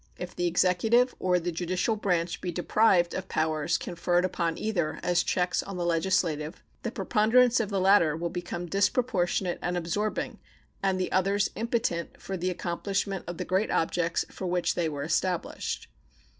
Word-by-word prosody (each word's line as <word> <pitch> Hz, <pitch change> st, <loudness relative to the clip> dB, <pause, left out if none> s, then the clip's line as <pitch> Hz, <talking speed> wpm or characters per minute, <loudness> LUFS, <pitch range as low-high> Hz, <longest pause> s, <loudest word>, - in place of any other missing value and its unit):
If 180 Hz, 0 st, -7 dB
the 175 Hz, -, 0 dB
executive 185 Hz, +8 st, +3 dB
or 180 Hz, -1 st, +2 dB
the 175 Hz, +1 st, -2 dB
judicial 180 Hz, +6 st, -1 dB
branch 175 Hz, -5 st, -1 dB
be 180 Hz, -, -2 dB
deprived 175 Hz, 0 st, +3 dB
of 185 Hz, 0 st, -4 dB
powers 155 Hz, +1 st, 0 dB
conferred 175 Hz, +1 st, 0 dB
upon 170 Hz, -2 st, -1 dB
either 175 Hz, -8 st, -1 dB
as 175 Hz, -1 st, +3 dB
checks 180 Hz, +1 st, 0 dB
on 195 Hz, -2 st, -7 dB
the 175 Hz, -, -1 dB
legislative, 165 Hz, -2 st, 0 dB, 0.2 s
the 235 Hz, -, -2 dB
preponderance 230 Hz, +3 st, +3 dB
of 220 Hz, -3 st, -1 dB
the 200 Hz, -2 st, 0 dB
latter 185 Hz, -5 st, +4 dB
will 170 Hz, 0 st, -3 dB
become 175 Hz, 0 st, -4 dB
disproportionate 195 Hz, -2 st, +1 dB
and 175 Hz, 0 st, -1 dB
absorbing 190 Hz, +5 st, -2 dB, 0.4 s
and 190 Hz, -1 st, +1 dB
the 185 Hz, -, -1 dB
others 195 Hz, +2 st, +2 dB
impotent 225 Hz, -7 st, -2 dB
for 195 Hz, -, -5 dB
the 185 Hz, 0 st, -1 dB
accomplishment 195 Hz, +2 st, -2 dB
of 175 Hz, -1 st, -5 dB
the -, -, -3 dB
great 190 Hz, +4 st, +1 dB
objects 165 Hz, +1 st, 0 dB
for 190 Hz, -, -5 dB
which 180 Hz, 0 st, +1 dB
they 170 Hz, -2 st, 0 dB
were 145 Hz, -2 st, -4 dB
established. 175 Hz, +3 st, -2 dB
180 Hz, 165 wpm, -28 LUFS, 170-195 Hz, 0.4 s, latter